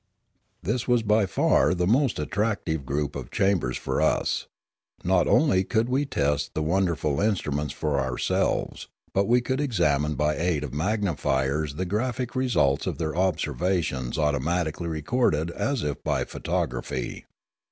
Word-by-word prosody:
This 115 +4 -1
was 120 -2 +3
by 105 -1 +3
far 90 - +3
the 90 0 0
most 125 +5 +2
attractive 85 - -1
group 70 +1 -2
of 70 -2 -6
chambers 95 -9 +1
for - - -2
us. - - +1 0.6
Not 90 0 +3
only 120 -12 +4
could 115 +4 0
we 135 +3 +1
test 75 - -1
the 80 - 0
wonderful 85 -4 +1
instru 100 -7 0
ments 75 +1 -2
for 75 -3 -1
ourselves; 65 -2 -1 0.3
but 100 +1 +2
we 120 +1 +4
could 130 +3 -1
examine 75 - +1
by 75 +2 +1
aid 85 -3 0
of 70 - -6
magnifiers 75 -6 0
the 95 - -2
graphic 120 +6 -2
results 120 - +2
of - - -2
their 80 -2 -2
observations 85 -6 0
automatically 80 +3 0
recorded 80 - 0
as 135 +6 -1
if 75 -1 -3
by - - 0
photography. - - -3
85 Hz, 145 wpm, -26 LUFS, 75-105 Hz, 0.6 s, only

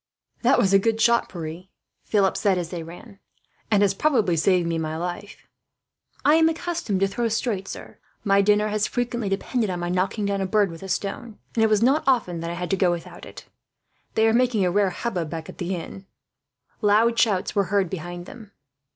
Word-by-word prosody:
"That 255 +3 +4
was 195 0 +2
a 195 - +7
good 225 +2 0
shot, 235 +1 +3
Pierre," 170 0 -7 0.4
Philip 200 -3 +2
said, 195 -3 +1
as 175 -2 -3
they 175 -2 -5
ran; 175 +5 -12 0.5
"and 205 -2 +4
has 195 -1 +3
probably 220 - +2
saved 175 +1 +2
my 160 -1 -2
life." 180 +4 -6 0.8
"I 295 - +6
am 325 0 +5
accustomed 325 - -2
to 195 - +4
throw 230 +5 -1
straight, 220 -3 -2
sir. - - -9 0.2
My 200 -1 +4
dinner 210 +1 +3
has 210 0 0
frequently 240 -3 -2
depended 215 +3 -1
on 180 -1 -3
my 175 0 -3
knocking 185 +4 -1
down 200 -1 -1
a 190 - -1
bird 205 -1 +2
with 165 - -10
a 195 - -8
stone, 210 +4 -4 0.2
and 225 - +2
it 220 - +4
was 215 0 +3
not 275 +5 +3
often 220 -10 +1
that 165 +1 -4
I 170 - -4
had 180 +1 -4
to - - +3
go 185 -1 +2
without 170 -1 -5
it. - - -11 0.7
"They 220 0 +4
are 225 - +3
making 235 -5 +2
a 180 - +1
rare 200 +1 +2
hubbub, 180 -4 -3
back 160 0 -6
at - - -11
the 185 +1 -2
inn." 190 +3 -8 0.7
Loud 225 +2 +3
shouts 200 -5 +1
were 200 -1 +2
heard 200 -1 +1
behind 175 0 -6
them. 220 -4 -12
195 Hz, 210 wpm, -24 LUFS, 180-225 Hz, 0.8 s, a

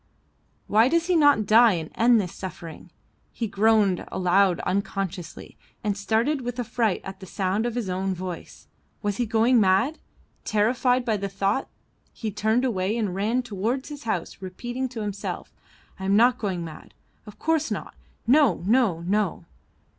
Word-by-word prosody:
Why 220 +3 +4
does 335 +4 +1
he 360 0 +1
not 290 -9 +5
die 225 +2 +6
and 160 -3 -4
end 235 0 +4
this 180 -4 -3
suffering? 175 -3 -8 0.4
He 235 - -3
groaned 205 -2 +2
aloud 185 0 +2
unconsciously 190 -2 -4 0.3
and 205 -2 0
started 225 +8 0
with 245 0 -5
affright 230 -4 0
at 195 0 -8
the 190 - -10
sound 195 +5 -1
of 240 - -4
his 240 -5 -2
own 190 +1 -2
voice. 180 -1 -7 0.4
Was 205 -1 -1
he 240 - 0
going 230 +2 +3
mad? 195 +11 +2 0.4
Terrified 245 +4 +1
by 220 -3 +1
the 200 0 -4
thought 195 +6 -1 0.4
he 220 -2 -5
turned 220 +5 +1
away 205 -2 -1
and 210 -5 -1
ran 220 +7 0
towards 235 +5 -3
his 290 -4 -9
house 195 -4 -3
repeating 240 +8 -4
to 235 -3 -6
himself, 205 -1 -5 0.5
I 190 - -5
am 195 +1 +3
not 240 +3 +4
going 185 -5 -2
mad; 160 -2 -11 0.3
of 210 - -11
course 320 -1 0
not, - - -5 0.3
no, 245 - +4
no, 215 -6 +2
no! 190 -1 -1
210 Hz, 160 wpm, -25 LUFS, 190-240 Hz, 0.5 s, die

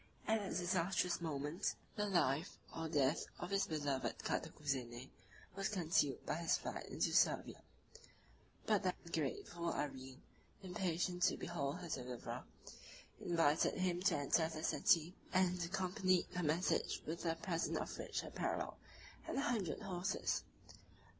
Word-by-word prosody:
At 220 0 +3
that 200 -2 -2
disastrous 180 0 +1
moment, 150 +1 -1 0.2
the 210 -1 0
life 170 -4 +2 0.2
or 165 0 -2
death 145 0 +2
of - - -5
his 195 0 +2
beloved 145 -4 -1
Cantacuzene 130 -4 -2 0.4
was 195 0 0
concealed 165 -7 +2
by - - 0
his 170 -1 +2
flight - - -5
into - - 0
Servia: - - +3 1.0
but 210 -3 +3
the 185 -2 +1 0.2
grateful 170 +3 -1
Irene, 130 -2 -4 0.4
impatient 180 -1 -1
to - - -3
behold 145 +1 -2
her 175 - -5
deliverer, 125 -5 -4 0.8
invited 165 -3 +3
him 180 -1 +1
to 195 - +4
enter 160 +3 +3
the 155 -1 -5
city, 170 -1 +4 0.2
and 180 -1 +3
accompanied 185 +1 +2
her 180 - +1
message 165 +3 +1
with 165 +2 -4
a 165 - +2
present 165 0 -1
of - - -3
rich - - -2
apparel - - -2 0.5
and - - -2
a - - +3
hundred 220 - 0
horses. 185 0 0
170 Hz, 135 wpm, -39 LUFS, 150-185 Hz, 1.0 s, to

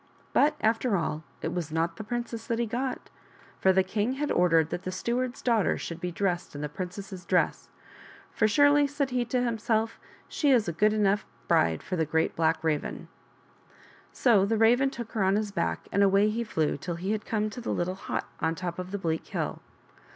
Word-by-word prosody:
But, 300 +1 +4
after 225 -1 +2
all, 155 -2 -2 0.2
it - - -2
was 170 -3 -3
not 165 +1 -1
the 220 - -5
princess 235 0 -4
that 230 - 0
he 235 - +1
got, 250 +4 -3 0.5
for 190 - +5
the 190 0 +4
king 210 +6 -1
had 290 +2 -2
ordered 165 -3 +3
that 175 - -3
the 185 - -4
steward's 245 +6 -2
daughter 230 -5 +2
should 170 0 -6
be 180 - -2
dressed 175 -3 -2
in 145 - -5
the 150 - -3
princess's 185 +3 -7
dress, - - 0 0.3
" - - -20
for 215 - +2
surely," 285 +5 +5
said 280 -1 -2
he 250 -1 +1
to 245 +1 0
himself, 225 -1 0
" - - -26
she 295 - 0
is 240 -7 +4
a 170 - -1
good 210 +6 +3
enough 205 -1 +2 0.2
bride 80 -1 +2
for 185 - -3
a 160 - +2
Great 160 +1 0
Black 160 0 +1
Raven." 155 -2 -2 1.0
So 225 -7 +4
the 220 +3 +1
Raven 240 +5 +4
took 235 -4 -7
her 215 - 0
on 190 +1 +3
his 210 -1 -1
back 85 - -2
and 200 - +2
away 200 +2 +4
he 230 +2 -1
flew 160 -10 0
till 175 +4 -4
he 185 +4 -3
had 215 0 -1
come 215 -1 -1
to 245 - -7
the 235 - -5
little 175 +1 -1
hut 190 - -4
on 160 0 0
top 175 0 -4
of 180 0 -5
the 200 - -3
bleak 160 -4 -2
hill. - - -3
200 Hz, 215 wpm, -28 LUFS, 175-235 Hz, 1.0 s, for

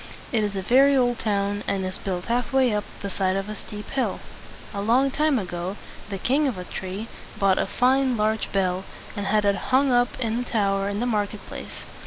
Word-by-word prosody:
It 225 -3 +2
is 205 -1 -2
a 190 - -2
very 275 +6 +5
old 245 -2 +2
town, 205 -1 0
and 195 -1 0
is 185 0 -4
built 185 -2 -3
half 245 +3 0
way 260 -4 +3
up 210 0 -1 0.2
the 200 - -2
side 185 0 0
of 195 +1 -2
a 215 - -5
steep 210 0 -8
hill. 270 -1 -1 0.5
A 200 - -3
long 250 +6 +3
time 300 0 +2
ago, 180 -1 -4 0.3
the 200 - -3
King 275 +9 +2
of 250 - -2
Atri 185 +3 -5 0.3
bought 195 -1 +3
a - - +1
fine 260 0 +2
large 215 +1 0
bell, 185 -1 0 0.3
and 205 -2 -3
had 210 0 +2
it 200 0 +4
hung 265 +1 +4
up 245 0 +2
in 230 -1 0
a - - -1
tower 200 -4 0
in 205 +2 -2
the - - +1
market 210 -3 -1
place. - - -8
210 Hz, 215 wpm, -25 LUFS, 195-245 Hz, 0.5 s, very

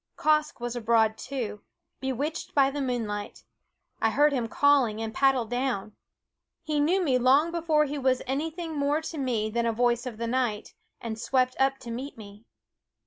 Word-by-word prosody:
Quoskh 305 -2 +1
was 240 0 -4
abroad 225 -2 +2
too, 225 -5 -5 0.4
bewitched 270 +4 -3
by 275 -1 +4
the 285 +1 -3
moonlight. 225 -6 -3 0.6
I 225 - +3
heard 290 +5 +3
him 245 -4 -1
calling 265 -4 +3
and 225 0 -4
paddled 260 -4 +2
down. 245 -5 -2 0.7
He 305 -2 -1
knew 355 +6 +2
me 260 -6 +2
long 275 +7 +4
before 320 -3 +2
he 290 0 -4
was 260 -1 +1
any 280 +5 -1
thing 325 -1 -6
more 290 +2 +1
to 320 -1 -6
me 230 -5 -1
than 235 +1 0
a - - +2
voice 240 +2 +1
of 235 -4 -6
the 230 - -3
night, 235 -3 -1 0.3
and 225 -1 -5
swept 255 +2 +1
up 270 0 +2
to 235 - -7
meet 260 +3 -6
me. 210 0 -12
255 Hz, 180 wpm, -27 LUFS, 230-290 Hz, 0.7 s, by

